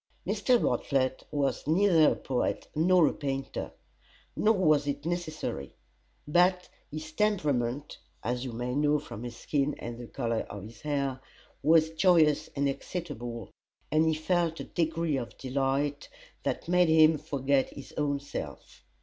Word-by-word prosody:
Mr. 220 +5 +2
Bartlett 130 - 0
was 140 -4 -1
neither 165 -1 +5
a - - 0
poet 130 -2 -2
nor 175 +2 +4
a - - 0
painter, 135 -1 -4 0.6
nor 220 +1 +3
was 155 -6 +3
it 145 +1 -3
necessary; 155 - -4 0.5
but 180 +3 +3 0.2
his 155 +1 -7
temperament 145 - 0 0.2
(as 125 +2 -2
you 130 - -4
may 120 +2 -3
know 150 +2 +3
from 140 -7 -8
his 120 -1 -6
skin 140 +4 -1
and 120 0 -7
the 120 - -8
color 115 -3 -2
of 100 -2 -7
his 110 +2 -12
hair) 140 -3 -1 0.4
was 160 +2 +4
joyous 160 -3 +4
and 140 0 +1
excitable, 130 - -5 0.4
and 155 +1 +3
he 160 - +2
felt 165 +1 0
a - - -4
degree 165 -3 -1
of 120 -4 -6
delight 135 +2 -1 0.3
that - - -3
made 180 -1 +4
him 160 -1 +6
forget 140 -1 0
his 140 - -11
own 145 -1 0
self. 140 - -8
145 Hz, 150 wpm, -29 LUFS, 135-165 Hz, 0.6 s, him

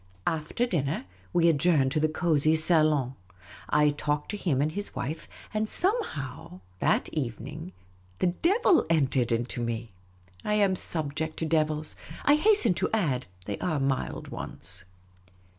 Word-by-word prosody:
After 160 +9 0
dinner, 150 - -1 0.3
we 170 -1 +4
adjourned 150 -4 +3
to 155 - +1
the 155 +1 +2
cosy 155 -1 +2
salon. 155 -5 +3 0.6
I 150 0 +4
talked 145 0 -2
to - - -3
him 160 -10 0
and 150 +2 +1
his 205 +4 -2
wife; 155 +6 -4 0.3
and 215 0 0
somehow, 155 - -2 0.2
that - - +2
evening, 150 +5 -5 0.5
the - - 0
devil 350 - +3
entered 135 -6 +2
into 120 +1 -1
me. 115 -1 -3 0.5
I 210 - +1
am 200 -3 +3
subject 160 -2 -2
to 165 - -1
devils. 155 -1 0 0.3
I 290 - +6
hasten 310 - +5
to - - +1
add, 145 - 0 0.2
they 100 - -4
are 160 -5 0
mild 135 -1 -2
ones. 90 +1 -4
155 Hz, 140 wpm, -28 LUFS, 135-180 Hz, 0.6 s, I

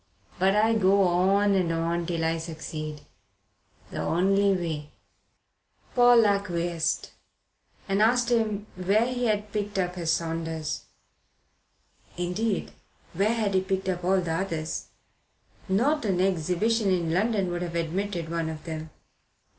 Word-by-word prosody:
But 190 +2 +3
I 220 +2 +4
go 200 -2 +4
on 190 +3 +3
and 180 -3 +1
on 165 +1 -1
till 165 -2 -1
I 165 0 0
succeed. 155 -2 -6 0.9
The - - -4
only 195 +3 +2
way." 160 -5 -2 1.0
Paul 245 -2 +6
acquiesced 175 -5 0 0.8
and 195 +1 +1
asked 240 +2 +3
him 215 -3 +1
where 195 +5 +2
he 250 0 -2
had 210 -1 -1
picked 205 -1 -3
up 180 -1 0
his 170 -3 -1
Saunders. 160 -1 -2 1.3
Indeed, 185 +4 -1 0.4
where 205 +6 +1
had 215 -4 0
he 190 - +3
picked 190 0 -2
up 180 -1 -2
all 190 +2 +3
the 170 -2 -3
others? 165 -3 -3 0.8
Not 265 +11 +2
an 190 -4 +1
exhibition 190 +4 +1
in 170 -3 0
London 200 -1 +1
would 175 0 -3
have 170 -1 -4
admitted 170 +1 -2
one 165 -1 -2
of 155 -1 -7
them. 160 -1 -6
185 Hz, 135 wpm, -27 LUFS, 165-205 Hz, 1.3 s, Paul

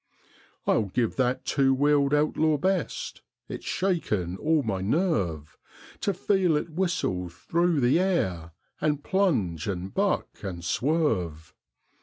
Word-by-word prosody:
I'll 110 - +2
give 115 +4 -1
that 125 -1 0
two 135 -1 +3
wheeled 145 0 +3
outlaw 150 +1 +2
best; 185 0 -2 0.3
it's - - -7
shaken 110 - -1
all 155 +2 +2
my 100 -5 -2
nerve 95 - -1 0.4
To 200 - 0
feel 185 -3 +2
it 160 - -4
whistle 155 - -1
through 165 - 0
the 125 +7 +4
air 95 - 0 0.3
and 150 -1 0
plunge 120 - 0
and 95 -1 -4
buck 200 0 0
and 90 -4 -6
swerve. 95 - 0
140 Hz, 125 wpm, -27 LUFS, -, 0.4 s, the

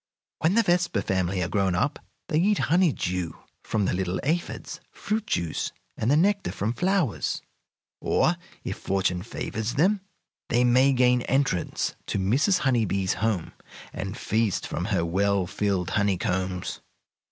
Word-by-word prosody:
When 165 +5 +2
the 230 - +5
Vespa 175 - +1
family 95 -1 0
are - - -1
grown 95 0 +1
up 140 - 0 0.3
they 155 - +1
eat 205 +4 +3 0.2
honey 180 -2 +5
dew 90 -7 -3 0.3
from 105 -3 0
the - - 0
little 90 0 -1
aphids, 170 +5 -2
fruit 215 +1 -3
juice, 85 -3 -1 0.2
and 110 - -1
the 145 - +5
nectar 200 +4 +2
from 110 +4 -2
flowers, 180 - 0 0.6
or, - - +2 0.3
if - - -4
fortune 95 -2 0
favors 110 +2 -4
them, 190 +7 +3 0.5
they 120 +1 +3
may 130 +3 +5
gain 125 -1 +4
entrance 135 -9 0
to - - -1
Mrs. 135 - +2
Honey 125 -6 +2
Bee's 95 -1 0
home, 110 -6 0 0.4
and 95 +4 -5
feast 110 -4 0
from - - -3
her 85 - 0
well 100 +2 +1
filled 95 -1 -1
honeycombs. 95 -2 -1
110 Hz, 150 wpm, -26 LUFS, 95-150 Hz, 0.6 s, the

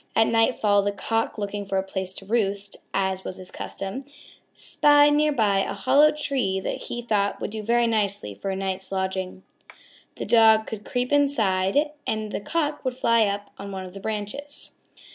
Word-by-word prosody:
At 225 - +5
nightfall 220 -3 +3
the 200 +1 0
Cock, 225 +4 -1
looking 205 0 -3
for 195 -1 -2
a 190 - +1
place 190 -1 -4
to 195 - -8
roost, 200 -2 -1 0.2
as 190 -1 -1
was 185 - -5
his 185 -1 -10
custom, 195 +8 -6 0.5
spied 290 0 +4
nearby 280 -10 +2
a 195 - -1
hollow 265 +8 +5
tree 265 -10 -1
that - - -3
he 240 - -5
thought 205 -3 0
would - - -4
do 220 0 -4
very 235 +2 +2
nicely 200 - 0
for 195 - -5
a 190 - -1
night's 190 0 -4
lodging. 190 -1 -3 0.7
The - - -5
Dog 220 -1 +5
could 210 -2 -7
creep 250 +1 -2
inside 275 -1 +2 0.2
and 215 -1 -2
the - - -3
Cock 300 +6 -2
would 255 -1 -2
fly 230 -4 +3
up 200 0 -4
on 200 0 -7
one 190 -1 -5
of 180 - -11
the 195 - -8
branches. 220 +8 -4
205 Hz, 180 wpm, -24 LUFS, 195-240 Hz, 0.7 s, At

